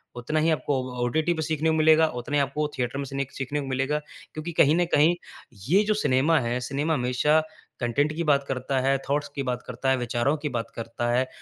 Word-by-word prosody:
उतना 130 +6 -1
ही 160 +2 +2
आपको 135 0 -1
अ, - - -8
ओटीटी 160 +6 +1
पे 160 - -3
सीखने 160 +1 +1
को 160 - +2
मिलेगा, 160 0 +5
उतना 145 +4 -4
ही 145 - +4
आपको 150 +3 -2
थिएटर 125 +1 -2
में 140 - -3
सिनेख 135 0 -4
सीखने 145 +3 -2
को 135 - -6
मिलेगा 135 +3 0 0.3
क्योंकि 155 +2 -5
कहीं 150 +2 +5
ना 175 0 +2
कहीं, 155 +4 +5 0.5
ये 200 +4 +5
जो 215 - +1
सिनेमा 145 +4 +3
है, 120 0 -1
सिनेमा 145 +4 0
हमेशा 140 +4 +2 0.4
कंटेंट 140 +5 +1
की 170 - -1
बात 140 -3 +3
करता 130 0 -1
है, 135 +1 +2
थॉट्स 145 +1 0
की 140 - -2
बात 125 -1 -2
करता 125 +2 -2
है, 130 - +3
विचारों 120 +4 0
की 150 0 -3
बात 115 -2 -3
करता 115 +1 -4
है, 130 +2 +2
140 Hz, 225 wpm, -25 LUFS, 125-155 Hz, 0.5 s, मिलेगा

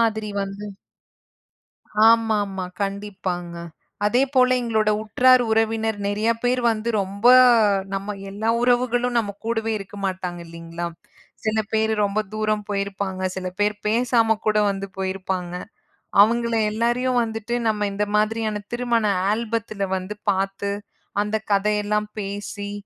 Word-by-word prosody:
மாதிரி 220 -2 +1
வந்து 195 +1 -6 1.5
ஆமாமா, 210 -4 +1 0.2
கண்டிப்பாங்க. 190 -3 -4 0.5
அதே 240 +5 +3
போல 255 -1 +5
எங்களோட 220 -3 +1
உற்றார், 250 +4 +5
உறவினர் 225 -1 +1
நெறாய 210 +3 +1
பேர் 250 +1 +2
வந்து 225 +1 -3
ரொம்ப 200 +3 -6 0.7
நம்ம 200 +1 -3
எல்லா 210 +3 -2
உறவுகளும் 245 0 +2
நம்ம 205 -3 0
கூடவே 225 -1 -1
இருக்க 195 +1 -10
மாட்டாங்க 185 -2 -3
இல்லீங்களா? 165 +1 -6 0.6
சில 215 0 +1 0.2
பேர் 220 0 +2
ரொம்ப 200 +1 -1
தூரம் 215 -1 0
போயிருப்பாங்க, 200 -1 -3 0.2
சில 185 -1 -4
பேர் 210 0 +2
பேசாம 230 0 +3
கூட 215 0 +2
வந்து 195 0 -3
போயிருப்பாங்க. 190 -2 -3 0.7
அவங்கள 235 +2 +3 0.2
எல்லாரயும் 240 +3 +1
வந்துட்டு 225 +1 -4
நம்ம 210 -1 +1
இந்த 205 +1 0
மாதிரியான 215 0 0
திருமண 240 -2 +1 0.3
ஆல்பத்துல 220 -2 -2
வந்து 190 +3 -6 0.2
பாத்து, 195 +1 -2 0.5
அந்தக் 215 +1 -2
கதயெல்லாம் 210 +1 +1
பேசி, 205 0 -5
210 Hz, 120 wpm, -23 LUFS, 195-225 Hz, 1.5 s, போல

